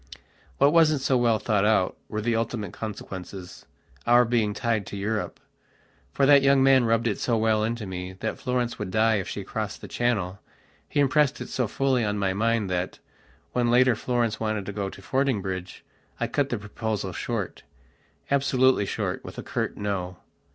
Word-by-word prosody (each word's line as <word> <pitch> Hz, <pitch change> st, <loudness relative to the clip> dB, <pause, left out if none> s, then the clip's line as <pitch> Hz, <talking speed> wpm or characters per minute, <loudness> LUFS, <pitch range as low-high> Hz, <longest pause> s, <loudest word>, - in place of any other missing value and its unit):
What 140 Hz, +2 st, +4 dB
wasn't 155 Hz, -4 st, +4 dB
so 130 Hz, -, +2 dB
well 120 Hz, -3 st, +3 dB
thought 105 Hz, -1 st, +1 dB
out 105 Hz, -3 st, +2 dB
were 110 Hz, 0 st, -3 dB
the 115 Hz, +1 st, 0 dB
ultimate 115 Hz, -4 st, -2 dB
consequencesour 95 Hz, -, -2 dB
being 110 Hz, -3 st, +1 dB
tied 110 Hz, -4 st, -1 dB
to 100 Hz, -, -6 dB
Europe. 105 Hz, +2 st, -2 dB, 0.7 s
For 140 Hz, -, +2 dB
that 140 Hz, 0 st, +7 dB
young 135 Hz, -1 st, +4 dB
man 135 Hz, -2 st, +5 dB
rubbed 115 Hz, 0 st, +2 dB
it 110 Hz, -4 st, 0 dB
so 120 Hz, -2 st, +1 dB
well 110 Hz, -1 st, +2 dB
into 115 Hz, 0 st, -2 dB
me 90 Hz, -1 st, -5 dB
that 105 Hz, +4 st, -4 dB
Florence 125 Hz, -2 st, -1 dB
would 105 Hz, -, -3 dB
die 110 Hz, +2 st, +3 dB
if 95 Hz, -, -3 dB
she -, -, -5 dB
crossed -, -, -4 dB
the -, -, -9 dB
Channelhe 100 Hz, -6 st, -1 dB, 0.5 s
impressed 145 Hz, 0 st, +2 dB
it -, -, -6 dB
so 125 Hz, -3 st, -1 dB
fully 130 Hz, +2 st, +1 dB
on 105 Hz, -1 st, -1 dB
my 95 Hz, -2 st, 0 dB
mind 115 Hz, +1 st, +1 dB
that, 90 Hz, 0 st, -2 dB, 0.5 s
when 120 Hz, -1 st, +1 dB
later 125 Hz, 0 st, +5 dB
Florence 120 Hz, -1 st, -1 dB
wanted 110 Hz, -3 st, -2 dB
to 105 Hz, -, -5 dB
go 100 Hz, -1 st, -2 dB
to -, -, -12 dB
Fordingbridge, 100 Hz, -9 st, -2 dB, 0.3 s
I -, -, +1 dB
cut 140 Hz, -1 st, 0 dB
the 120 Hz, -, -1 dB
proposal 105 Hz, -2 st, -4 dB
shortabsolutely 130 Hz, +3 st, -1 dB
short, -, -, -3 dB
with -, -, -10 dB
a -, -, -5 dB
curt -, -, -3 dB
no. 95 Hz, -3 st, -3 dB
110 Hz, 170 wpm, -26 LUFS, 100-125 Hz, 0.7 s, that